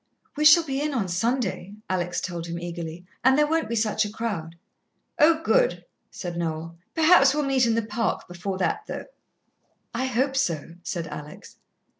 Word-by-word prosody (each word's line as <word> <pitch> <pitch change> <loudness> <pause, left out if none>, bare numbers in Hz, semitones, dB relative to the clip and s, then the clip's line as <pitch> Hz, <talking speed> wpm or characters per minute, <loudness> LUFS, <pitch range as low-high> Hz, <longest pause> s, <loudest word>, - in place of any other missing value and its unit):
"We 300 +1 0
shall 305 +3 +8
be 275 -3 -2
in 295 -1 -1
on 210 -6 0
Sunday," 195 0 -1
Alex 175 -1 -1
told 170 -2 -4
him 170 0 -4
eagerly, 170 0 -6 0.2
"and 260 +2 +5
there 300 - +5
won't 320 +2 0
be 235 - -1
such 215 -1 +1
a 210 - -3
crowd." 200 -8 -4 0.6
"Oh, 320 +1 +5
good," - - +2 0.2
said 175 -2 -6
Noel. 165 0 -3 0.2
"Perhaps 310 -4 +6
we'll 300 - +1
meet 265 -3 +2
in 225 - +2
the 230 - +1
Park 225 +2 -2
before 180 +2 -4
that, 190 - 0
though." - - -5 0.9
"I 255 +3 -1
hope 260 +2 0
so," 165 - -1
said 175 -2 -4
Alex. 150 -1 -10
215 Hz, 175 wpm, -25 LUFS, 175-270 Hz, 0.9 s, shall